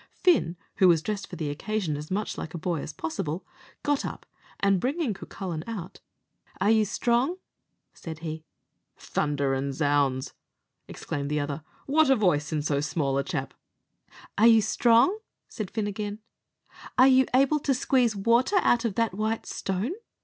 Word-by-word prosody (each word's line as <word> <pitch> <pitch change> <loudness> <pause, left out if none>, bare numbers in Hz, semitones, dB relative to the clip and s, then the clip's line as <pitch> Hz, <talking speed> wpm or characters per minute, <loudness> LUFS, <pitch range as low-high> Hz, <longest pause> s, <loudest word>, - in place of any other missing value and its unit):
Fin, 180 - +2 0.2
who 190 - +6
was 165 -3 +4
dressed 210 -2 -3
for 180 - -8
the 155 -3 -3
occasion 185 +1 -2
as 150 +1 -7
much 205 +3 -2
like 160 - -6
a - - -2
boy 165 -2 -2
as - - -6
possible, 160 +2 -4 0.4
got 290 -1 +1
up, - - -6 0.3
and 195 -1 +3
bringing 275 -2 0
Cucullin 180 -4 -6
out, 200 -5 -6 0.6
"Are 200 +3 +3
you 220 -1 +4
strong?" 245 - +1 0.6
said 160 -2 -8
he. 155 0 -5 0.5
"Thunder 145 -2 -1
an' 135 +1 -1
ounds!" 145 -3 +1 0.5
exclaimed 140 0 -5
the 150 0 0
other, 145 +1 -3 0.2
"what 300 +1 +3
a 270 - +6
voice 175 - +1
in 150 -2 -1
so 145 -2 0
small 145 -2 -1
a - - 0
chap!" 135 -1 -4 0.9
"Are 225 - +7
you 225 -2 +6
strong?" 240 - +4 0.3
said 215 -4 -5
Fin 215 0 -2
again; 205 0 -4 0.8
"are 255 +1 +8
you 260 -1 +5
able 275 +3 +4
to 280 -1 +1
squeeze 250 -3 +2
water 235 - +3
out 240 0 +3
of 215 -4 -1
that 230 -4 +1
white 220 +3 -2
stone?" 195 - -2
195 Hz, 165 wpm, -27 LUFS, 155-235 Hz, 0.9 s, are